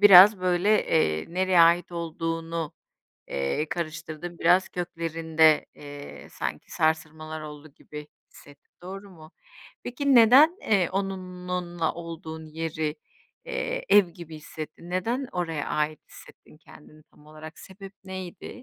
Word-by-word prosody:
biraz 200 0 +9
böyle, 180 +2 +1 0.2
eee, 80 - +1
nereye 185 -1 +4
ait 170 +1 +4
olduğunu, 165 -1 -3 0.6
eee, 70 - -2
karıştırdın 165 0 -5
biraz 185 +1 +4
köklerinde, 165 -2 +1
eee, 145 0 -10
sanki - - -5
sarsılmalar 155 0 -1
oldu 150 0 -9
gibi 150 0 -10 0.2
hissettin, 145 0 -18
doğru 195 +2 -8
mu? 160 -3 -15 0.5
Peki 270 +2 +1
neden, 265 - +7
eee, 195 -5 +2
onunla 180 -3 -3
olduğun 160 -1 -8
yeri, 155 -1 -3 0.5
eee, - - -3
ev 205 -3 +7
gibi 165 -1 -10
hissettin? 155 +2 -9
Neden 235 +9 -1
oraya 165 -4 -3
ait 150 0 -1
hissettin - - -16
kendini 155 -1 -17
tam 150 - -23
olarak? 155 +1 -11
Sebep 195 0 -11
neydi? 185 -2 -7
165 Hz, 120 wpm, -26 LUFS, 155-185 Hz, 0.6 s, biraz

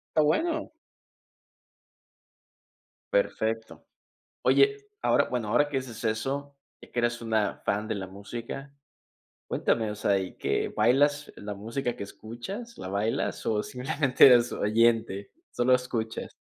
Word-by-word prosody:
Está 155 - +5
bueno. 315 - +1 2.4
Perfecto. 115 - -1 0.6
Oye, 415 0 +3 0.2
ahora - - +4
bueno, 120 -4 -2
ahora 120 +7 +3
que 140 -2 0
haces 120 -3 -7
eso 135 +6 -2 0.3
y - - -14
que 120 - -1
eres 120 0 0
una 110 -3 0
fan 105 +2 -1
de 110 - -1
la 95 - -4
música, 115 +8 -7 0.8
cuéntame. 110 -2 +1
O 105 - -5
sea, 100 -1 +2
¿y 95 -1 -5
qué?, - - 0
¿bailas 145 +4 +3
la 105 0 -6
música 115 +5 -3
que - - -5
escuchas, 190 - -8
la - - -6
bailas 100 +4 -1
o, 105 -1 +1
simplemente 135 +2 +3
eres 120 -2 +6
oyente? 110 -2 +2 0.2
¿Solo 125 +1 +3
escuchas? 120 -3 -2
120 Hz, 130 wpm, -28 LUFS, 110-140 Hz, 2.4 s, eres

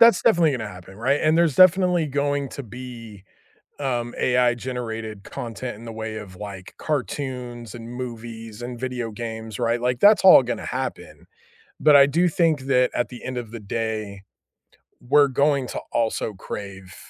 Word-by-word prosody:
that's 230 -7 +7
definitely 165 -3 +4
gonna 110 -5 -3
happen, 95 0 -12
right? 135 +6 +1
And 155 +1 +3
there's 170 -5 +3
definitely 180 -2 +5
going 140 0 -1
to 140 - -6
be, 115 -4 -10 0.5
um, 120 -4 -2
AI 125 -1 +3
generated 115 -4 -5
content 120 -2 -6
in 115 - -12
the 115 - -7
way 110 0 -5
of, 105 -3 -8
like, 100 -2 -9
cartoons 125 -5 -4
and 115 -1 -9
movies 115 -2 -7
and 120 0 -6
video 125 -3 -3
games, 110 -1 -6
right? 120 0 +1
Like, 125 0 0
that's 210 -1 +6
all 190 - +9
gonna - - -4
happen. - - -5 0.5
But 150 -1 +7
I 140 0 +8
do 170 +6 +2
think 160 -4 +1
that 125 -1 +2
at 120 - 0
the 125 - -11
end 130 - -4
of 115 -3 -6
the 115 - -7
day, 110 -2 -4 0.8
we're 140 +3 +4
going 140 0 +1
to - - -4
also 110 -2 -1
crave 95 -1 -8
120 Hz, 170 wpm, -23 LUFS, 110-140 Hz, 0.8 s, all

